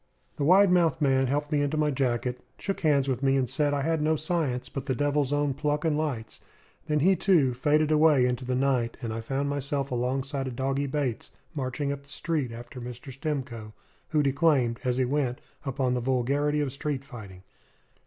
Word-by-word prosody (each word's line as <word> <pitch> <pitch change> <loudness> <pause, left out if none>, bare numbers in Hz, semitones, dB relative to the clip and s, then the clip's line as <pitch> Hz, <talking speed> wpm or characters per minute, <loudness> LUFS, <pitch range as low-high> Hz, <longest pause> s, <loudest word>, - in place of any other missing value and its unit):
The - - -1
wide 185 +5 +6
mouthed 170 -3 +3
man 135 -3 +3
helped 145 +3 -1
me 150 -1 +2
into 145 +2 0
my 150 -1 +2
jacket, 125 -2 -1 0.2
shook 195 - -3
hands 145 -4 +2
with 130 -2 -1
me, 135 -1 +3
and 130 -2 +1
said 145 +4 +1
I 145 -1 0
had 160 0 0
no 155 +1 +2
science, 155 -6 -1
but 135 +1 -6
the 130 - 0
devil's 145 0 +1
own 145 -1 +1
pluck 150 +2 -1
and 155 -2 +2
lights. 140 -8 -3 0.5
Then 150 -1 +1
he, 190 +5 +5
too, 165 -8 +3
faded 150 +4 +2
away 150 -4 +5
into 125 +1 -1
the 125 0 -1
night; 130 -3 +1
and 115 -1 -3
I 115 - -4
found 135 +5 -2
myself 140 -1 -2
alongside 135 +2 -1
of 125 - -5
Doggy 135 +2 -1
Bates, 135 -4 -2 0.2
marching 140 0 -2
up 140 0 -5
the 140 - -23
street 150 -4 -2
after 120 +2 -9
Mr. 125 +3 -8
Stimcoe, 130 -6 -4 0.4
who 150 -2 +2
declaimed, 135 -4 +2
as 125 -1 0
he 130 - +2
went, 135 -1 -1 0.3
upon 130 -1 0
the 125 - -1
vulgarity 140 +4 +1
of 135 -3 -2
street 140 -1 -3
fighting. 100 -9 -11
140 Hz, 200 wpm, -27 LUFS, 125-150 Hz, 0.5 s, wide